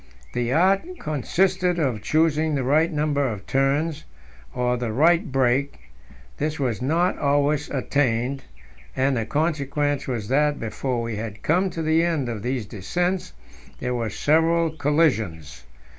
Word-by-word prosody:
The 120 Hz, 0 st, -1 dB
art 195 Hz, -, +2 dB
consisted 180 Hz, +5 st, 0 dB
in 130 Hz, -9 st, 0 dB
choosing 155 Hz, +1 st, +1 dB
the 135 Hz, -, -1 dB
right 155 Hz, +6 st, +2 dB
number 145 Hz, -2 st, 0 dB
of 105 Hz, -5 st, -5 dB
turns, 145 Hz, +3 st, 0 dB, 0.5 s
or 125 Hz, 0 st, 0 dB
the 120 Hz, -2 st, -3 dB
right 165 Hz, +7 st, +3 dB
brake; 135 Hz, +2 st, +1 dB, 0.6 s
this 155 Hz, +1 st, -2 dB
was 125 Hz, -4 st, -1 dB
not 170 Hz, +7 st, +1 dB
always 145 Hz, +1 st, +1 dB
attained, 135 Hz, -1 st, 0 dB, 0.5 s
and 135 Hz, +1 st, +1 dB
the 115 Hz, -2 st, -2 dB
consequence 145 Hz, -2 st, -1 dB
was 115 Hz, -6 st, -3 dB
that, 145 Hz, +2 st, +2 dB
before 120 Hz, +2 st, -3 dB
we 115 Hz, -2 st, -4 dB
had 105 Hz, -2 st, -6 dB
come 180 Hz, +5 st, +2 dB
to 165 Hz, -2 st, -4 dB
the 160 Hz, +1 st, +3 dB
end 160 Hz, -7 st, 0 dB
of 110 Hz, -3 st, -4 dB
these 125 Hz, 0 st, -2 dB
descents, 175 Hz, -, -2 dB, 0.5 s
there 125 Hz, -, -2 dB
were 115 Hz, -2 st, -2 dB
several 165 Hz, -, +2 dB
collisions. 115 Hz, -, 0 dB
145 Hz, 145 wpm, -23 LUFS, 125-160 Hz, 0.6 s, right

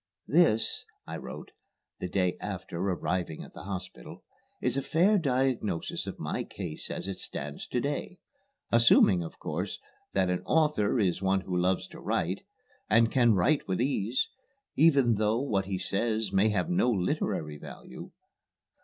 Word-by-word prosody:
"This," 150 Hz, -9 st, +3 dB, 0.2 s
I -, -, -5 dB
wrote -, -, -8 dB, 0.5 s
(the -, -, -3 dB
day 90 Hz, -1 st, +1 dB
after 95 Hz, -4 st, -5 dB
arriving 90 Hz, -3 st, -1 dB
at -, -, -13 dB
the -, -, -10 dB
hospital) 95 Hz, -10 st, -7 dB, 0.4 s
"is 125 Hz, 0 st, +1 dB
a 140 Hz, -, +1 dB
fair 180 Hz, +9 st, +3 dB
diagnosis 130 Hz, -, 0 dB
of -, -, -5 dB
my -, -, -3 dB
case 90 Hz, -6 st, -6 dB
as -, -, -3 dB
it 95 Hz, -, -5 dB
stands 75 Hz, +1 st, -6 dB
to 125 Hz, -, -1 dB
day, 145 Hz, -, -3 dB, 0.5 s
assuming, 115 Hz, -5 st, +6 dB
of 80 Hz, -, -7 dB
course, -, -, -3 dB, 0.4 s
that 95 Hz, -2 st, +2 dB
an 90 Hz, -, -1 dB
author 150 Hz, -8 st, +2 dB
is 95 Hz, -4 st, +1 dB
one 95 Hz, 0 st, +2 dB
who 95 Hz, -1 st, -4 dB
loves 90 Hz, +1 st, +1 dB
to -, -, -11 dB
write, -, -, -1 dB, 0.5 s
and 115 Hz, +2 st, +4 dB
can 120 Hz, -4 st, +4 dB
write 140 Hz, -, +2 dB
with 95 Hz, -1 st, -1 dB
ease, 125 Hz, -2 st, +1 dB, 0.5 s
even 140 Hz, -7 st, +5 dB
though 110 Hz, +2 st, +2 dB
what 105 Hz, -8 st, 0 dB
he 95 Hz, -1 st, -2 dB
says 110 Hz, +1 st, -1 dB
may 100 Hz, +3 st, +4 dB
have 90 Hz, -5 st, 0 dB
no 90 Hz, +8 st, +2 dB
literary 90 Hz, -7 st, -1 dB
value. 65 Hz, -, -10 dB
100 Hz, 155 wpm, -29 LUFS, 90-125 Hz, 0.5 s, assuming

